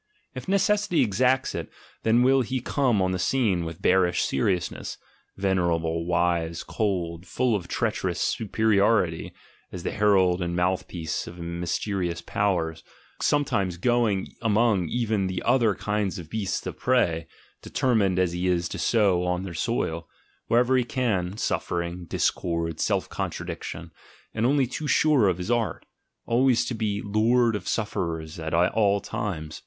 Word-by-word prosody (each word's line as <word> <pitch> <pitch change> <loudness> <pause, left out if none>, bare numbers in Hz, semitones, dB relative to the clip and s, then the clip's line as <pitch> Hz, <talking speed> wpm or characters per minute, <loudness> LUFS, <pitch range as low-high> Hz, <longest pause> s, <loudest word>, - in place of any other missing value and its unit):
If - - -8
necessity 200 -1 +2
exacts 125 +5 +1
it, - - -5 0.3
then 115 +2 +3
will 135 +1 +4
he 130 +2 -2
come 125 -5 +1
on 95 - +1
the 90 - -2
scene 100 -6 +1
with 80 0 -8
bearish 90 -2 +3
seriousness, 90 +6 -1 0.4
venerable, 85 -4 0
wise, 85 -1 0
cold, 90 -5 -2
full 120 +4 +1
of 90 -4 -4
treacherous - - -1
superiority, 105 -5 +1 0.4
as 90 - -7
the - - -2
herald 95 -4 +3
and 85 0 -2
mouthpiece 90 -2 -2
of 85 - -9
mysterious 85 +1 -2
powers, 85 -4 -1 0.4
some 145 0 +2
times 95 -7 -1
going 115 -2 +1
among 110 -5 +2
even 110 -5 0
the 95 -1 -3
other 120 -4 +3
kind 105 -2 -2
of 80 -3 -9
beasts 105 -4 -2
of - - -6
prey, 85 -11 +1 0.3
determined 105 -8 +1
as 90 -2 +2
he 90 +1 -2
is 90 -1 +1
to - - -5
sow 100 -6 +2
on 90 +1 -1
their 95 -3 -6
soil, 80 0 -2 0.4
wherever 125 +2 +3
he 130 - +3
can, 105 -8 -1
suffering, 85 -3 -2
discord, 85 -1 -1
self - - 0
contradiction, - - -5 0.4
and 115 +2 +1
only 140 0 +3
too 140 +5 -5
sure 145 -8 +4
of 90 -2 +1
his 90 +6 -3
art, 120 -2 -1 0.4
always 125 +1 +3
to - - -3
be 105 -2 -2
lord 115 +3 +3
of 95 -3 -5
sufferers 85 -6 -3
at 80 0 -2
all 100 +3 +3
times. 80 -7 -5
95 Hz, 150 wpm, -26 LUFS, 85-115 Hz, 0.4 s, will